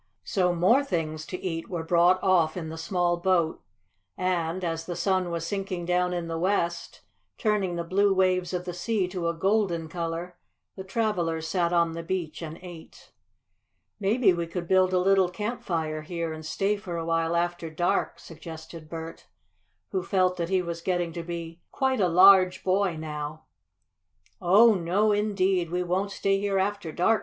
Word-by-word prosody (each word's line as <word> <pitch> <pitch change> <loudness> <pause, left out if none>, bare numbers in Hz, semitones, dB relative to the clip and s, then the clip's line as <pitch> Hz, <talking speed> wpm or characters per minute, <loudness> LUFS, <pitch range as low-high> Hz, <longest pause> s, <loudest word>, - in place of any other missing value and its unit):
So 180 -3 +1
more 230 +11 +4
things 155 - -3
to 185 - -5
eat 165 -3 -4
were 170 -3 -3
brought 175 +2 +4
off 175 -3 +3
in 160 -3 -4
the 160 - -7
small 175 0 0
boat, 175 -2 +1 0.6
and, 180 -1 -1
as 165 -1 -3
the 175 - -3
sun 185 -2 0
was 170 -1 -3
sinking 190 -2 -3
down 180 +1 +1
in 175 -1 -3
the 165 0 -3
west, 170 -2 -1 0.4
turning 205 -5 0
the 170 - -2
blue 200 +4 +2
waves 185 -1 +2
of 180 -1 -3
the 180 - -4
sea 195 +1 -1
to 180 -2 -3
a 170 - 0
golden 190 -2 +1
color, 170 +1 -5 0.4
the 190 - -7
travelers 180 -6 -1
sat 170 0 0
on 170 -1 +2
the 165 +1 -5
beach 165 -3 -4
and 160 0 -6
ate. 175 -3 -12 0.9
"Maybe 205 0 +3
we 170 -1 -3
could 170 0 -5
build 185 0 +4
a 185 - +2
little 190 0 +3
campfire 170 -7 -3
here 165 0 -4
and 155 0 -8
stay 195 +6 0
for 180 -4 -6
a 165 - -3
while 165 0 0
after 175 -1 -1
dark," 175 +3 0
suggested 160 -1 -10
Bert, 165 0 -8 0.6
who 190 - 0
felt 185 0 +1
that 170 -1 -2
he 190 -1 +1
was 170 -1 -5
getting 175 -2 -1
to 170 - -4
be 170 0 -7
quite 265 -2 0
a 185 - +4
large 185 +1 +6
boy 190 -1 +1
now. 150 0 -6 1.0
"Oh, 205 +6 +6
no 195 +4 +1
indeed! 195 -4 +1
We 180 +1 -1
won't 185 +3 -1
stay 195 0 0
here 200 -1 0
after 195 -3 -1
dark!" 215 +7 +2
175 Hz, 175 wpm, -27 LUFS, 165-190 Hz, 1.0 s, large